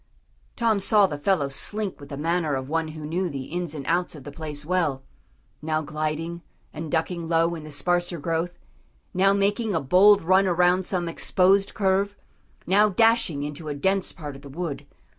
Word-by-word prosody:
Tom 225 -4 +2
saw 205 +1 +4
the 145 -6 -4
fellow 160 -3 +1
slink 200 +8 -3
with 140 - -12
the 140 - -6
manner 165 -1 0
of 130 0 -4
one 160 +2 -1
who 155 -1 -8
knew 175 +4 -1
the 135 -3 -5
ins 170 +1 -4
and 140 -3 -6
outs 175 +2 0
of 145 - -11
the 145 - -8
place 150 -1 -7
well, 155 -6 0 0.6
now 155 0 -1
gliding, 155 +3 -3 0.3
and 160 -1 -6
ducking 165 +1 -1
low 165 +1 +2
in 160 -2 -6
the 155 - -9
sparser 175 +3 0
growth, 165 +3 -2 0.6
now 195 +2 +4
making 200 +1 +1
a - - +2
bold 195 +8 +5
run 190 +3 +4
around 180 +1 +3
some 180 -3 -1
exposed 190 +3 +2
curve, 200 0 +1 0.5
now 205 +4 +4
dashing 215 -8 +2
into 150 +2 -5
a 145 - -3
dense 190 +6 0
part 145 -5 -8
of 135 - -12
the 140 - -11
wood. 160 0 -5
170 Hz, 185 wpm, -25 LUFS, 150-190 Hz, 0.6 s, bold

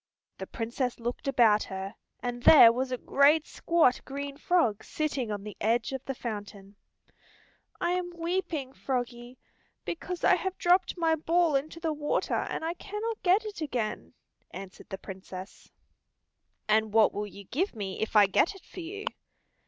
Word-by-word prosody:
The - - -5
Princess 240 +2 -3
looked 240 +3 -4
about 225 -6 +4
her, 190 +1 -6 0.3
and 245 0 -4
there 240 -3 +9
was 255 +2 -2
a 255 - -1
great 295 +5 +4
squat 330 -7 +2
green 280 +1 -5
frog 285 - +1
sitting 280 -7 -2
on 205 -1 -4
the 210 0 -8
edge 230 +5 +1
of 265 -1 -4
the 270 - -3
fountain. 205 -4 -7 1.0
"I 345 - 0
am 360 0 -1
weeping, 330 -6 -2
Froggie, 245 -1 -4 0.5
because 350 +1 -5
I - - +6
have 380 -1 -3
dropped 360 +1 +3
my 330 -2 +2
ball 325 0 +2
into 305 +4 -2
the 325 -2 -1
water 295 0 -1
and - - -2
I 330 - -1
cannot 425 +5 -5
get 390 +4 +3
it 415 -5 -7
again," 220 - -3 0.3
answered 185 +1 -10
the 195 - -5
Princess. 190 0 -10 1.0
"And 215 0 +2
what 220 -1 +5
will 210 0 -3
you 200 0 -11
give 300 - -2
me 195 -3 -5
if 220 - -3
I 210 -1 +8
get 295 - +2
it 385 - -15
for - - -11
you?" 395 +5 -6
265 Hz, 165 wpm, -29 LUFS, 215-335 Hz, 1.0 s, there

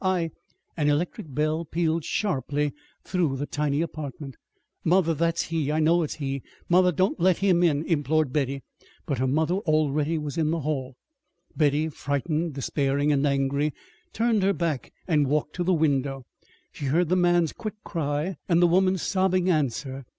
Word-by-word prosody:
I 180 -3 +1 0.2
" - - -45
An 150 -2 +2
electric 150 0 -1
bell 155 +4 0
pealed 165 0 -1
sharply 145 - -1 0.3
through 170 -8 0
the 145 - -2
tiny 145 0 -1
apartment. 145 -4 -7 0.5
"Mother, 170 -1 +3
that's 165 +2 0
he! 160 -3 -1
I 155 - +1
know 165 +2 +4
it's 155 - -3
he! 140 -2 -3 0.3
Mother, 180 +1 +4
don't 185 +4 0
let 180 0 +3
him 185 -3 +3
in," 160 -3 +2
implored 155 -3 +1
Betty. 140 -2 -1 0.4
But 140 -7 -2
her 130 - +1
mother 155 +5 +1
already 155 -2 +1
was 150 +1 -4
in 155 -1 +2
the 165 0 -1
hall. 135 -3 -3 0.6
Betty, 150 0 +2
frightened, 150 +2 -2
despairing, 140 +1 0
and 145 0 +2
angry, 140 +1 0 0.4
turned 225 -2 +1
her 195 +1 +3
back 165 -7 -2 0.2
and 150 -5 +2
walked 150 +1 -1
to 180 - 0
the 185 - +1
window. 140 -5 +1 0.5
She 145 - -7
heard 160 +5 +2
the 185 - +3
man's 175 -3 +3
quick 215 -1 -6
cry 155 +1 -2
and 170 -1 +4
the 175 - +6
woman's 185 +1 +2
sobbing 185 -1 +2
answer. 135 -3 -2
155 Hz, 170 wpm, -26 LUFS, 145-175 Hz, 0.6 s, the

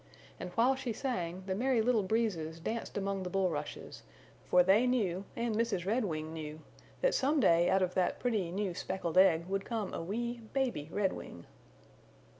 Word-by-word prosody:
And 180 - -5
while 240 +5 +4
she 260 -3 -3
sang 185 -8 -3
the 190 - -1
Merry 250 +4 +1
Little 225 0 +3
Breezes 185 -6 -1
danced 225 +7 -4
among 195 -1 -1
the 180 - -4
bulrushes, 175 -6 -2 0.5
for 180 - +6
they 205 +7 +4
knew, 200 -7 0
and 235 -1 -1
Mrs. 210 -6 0
Redwing 175 -8 -1
knew, 155 -1 -6 0.4
that - - +3
some 285 +3 +2
day 170 -7 +4
out 190 0 +3
of 180 0 -1
that 185 -1 +1
pretty 215 -8 0
new 190 +1 -2
speckled 185 -1 -1
egg 170 -3 +5
would 195 +1 -2
come 220 -4 -3
a - - -3
wee 235 +7 -3
baby 245 - -1
Redwing. 190 - -3
195 Hz, 170 wpm, -32 LUFS, 175-230 Hz, 0.5 s, for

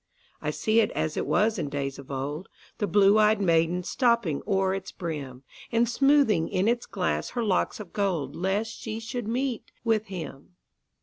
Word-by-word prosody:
I - - -2
see 220 +1 +2
it 225 - +3
as 155 - -1
it - - -2
was 215 -1 +2
in 150 -4 -2
days 140 -1 -3
of 140 - -12
old, 145 +6 -4 0.3
The 205 - 0
blue 200 +3 +5
ey'd 215 0 +4
maiden 170 -1 +2
stooping 235 - +1
o'er 190 -2 +2
its 195 -1 -5
brim, 140 -7 -6 0.3
And 230 +1 +3
smoothing 270 - +3
in 190 +1 +1
its 240 +1 0
glass - - -1
her 240 - +1
locks 195 -1 0
of 205 -5 -9
gold, 175 -9 -1
Lest 195 +5 -1
she 220 0 -5
should 230 0 -5
meet 250 +1 -2
with 220 -2 +1
him. 175 -3 -8
195 Hz, 180 wpm, -27 LUFS, 165-225 Hz, 0.3 s, blue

